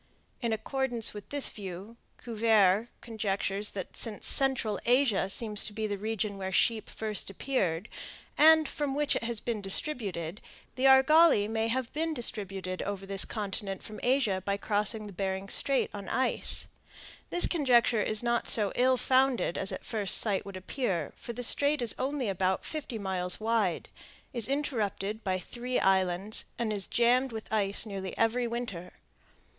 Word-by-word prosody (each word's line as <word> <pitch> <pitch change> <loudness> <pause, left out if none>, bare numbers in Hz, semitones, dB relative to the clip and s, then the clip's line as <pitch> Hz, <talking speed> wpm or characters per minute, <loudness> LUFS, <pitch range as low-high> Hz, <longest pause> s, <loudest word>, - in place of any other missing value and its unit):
In 235 -2 -1
accordance 235 +1 -2
with 210 -1 -10
this 285 -1 +2
view, 195 +2 -8 0.2
Cuvier 220 -3 +2
conjectures 205 -2 -2
that 190 -2 -6
since 220 -3 -3
central 255 -7 +2
Asia 240 -6 +2
seems 210 0 0
to 210 - -5
be 220 +1 -3
the 205 -1 -2
region 215 -1 -3
where 190 - -4
the - - -8
sheep 225 +2 +1
first 215 -2 -3
appeared, 195 -5 -2 0.5
and 315 0 +6
from 280 -1 -3
which 290 -1 +1
it - - -2
has 230 -1 -1
been 225 -2 -3
distributed, 195 - -1 0.3
the 260 - -1
argali 270 -3 +6
may 225 +1 -1
have 245 +1 -2
been 320 +1 -2
distributed 195 -6 -3
over 195 -1 -4
this 195 0 0
continent 195 -2 -5
from 215 - -9
Asia 245 -7 +1
by 200 0 -1
crossing 210 +1 0
Bering 190 +1 -3
Strait 275 +6 +3
on 200 -2 -7
ice. 260 - +2 0.6
This 350 - +4
conjecture 245 -8 +3
is 215 +2 0
not 235 0 0
so 210 -3 +4
ill 255 +1 +3
founded 260 -8 +2
as 195 - -1
at - - -7
first 210 -5 +1
sight 205 -4 +1
would 195 -1 -7
appear; 185 - -3
for - - -8
the 245 +2 -5
Strait 285 +5 +3
is 240 -2 +2
only 270 -2 -2
about 190 -1 -1
fifty 295 -7 -5
miles 185 -3 -3
wide, 220 -5 0 0.5
is 235 -4 +3
interrupted 220 -7 -2
by 185 -2 0
three 245 +7 -3
islands, 190 +2 +1
and 225 -2 -1
is 200 -2 -2
jammed 250 +2 +2
with 220 -1 -7
ice 200 0 +2
nearly 195 -3 -6
every 235 +2 +1
winter. 230 -7 -5
220 Hz, 160 wpm, -29 LUFS, 195-250 Hz, 0.6 s, and